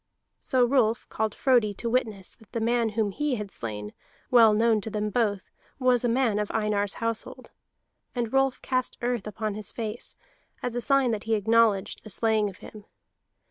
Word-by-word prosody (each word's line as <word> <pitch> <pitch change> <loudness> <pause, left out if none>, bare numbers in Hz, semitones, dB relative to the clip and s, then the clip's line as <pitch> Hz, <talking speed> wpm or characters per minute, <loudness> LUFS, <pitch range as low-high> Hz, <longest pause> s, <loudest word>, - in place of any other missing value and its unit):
So 255 -2 +2
Rolf 240 -3 +2
called 220 -1 -2
Frodi 240 -7 +2
to 235 - -4
witness 220 -6 -1
that 220 - -21
the 230 - -1
man 230 0 +1
whom 215 -3 +1
he 295 +4 -1
had 210 -3 -6
slain, 105 -2 -6 0.4
well 230 -3 +7
known 220 0 +3
to 220 - -5
them 210 0 -2
both, 205 -4 -1 0.3
was 255 -2 +3
a 240 - +2
man 230 -3 +2
of 210 - -2
Einar's 210 -2 0
household. 230 -1 -3 0.6
And 235 -1 -2
Rolf 270 -1 +1
cast 255 -1 -1
earth 240 -4 -1
upon 215 0 -3
his 210 -1 -4
face, 225 0 -5 0.5
as 245 -1 -2
a 245 - -1
sign 270 0 +3
that 215 -1 -3
he 225 0 +2
acknowledged 220 -1 +2
the 215 - -10
slaying 215 0 +1
of 190 - -12
him. 210 -2 -12
225 Hz, 180 wpm, -26 LUFS, 210-245 Hz, 0.6 s, well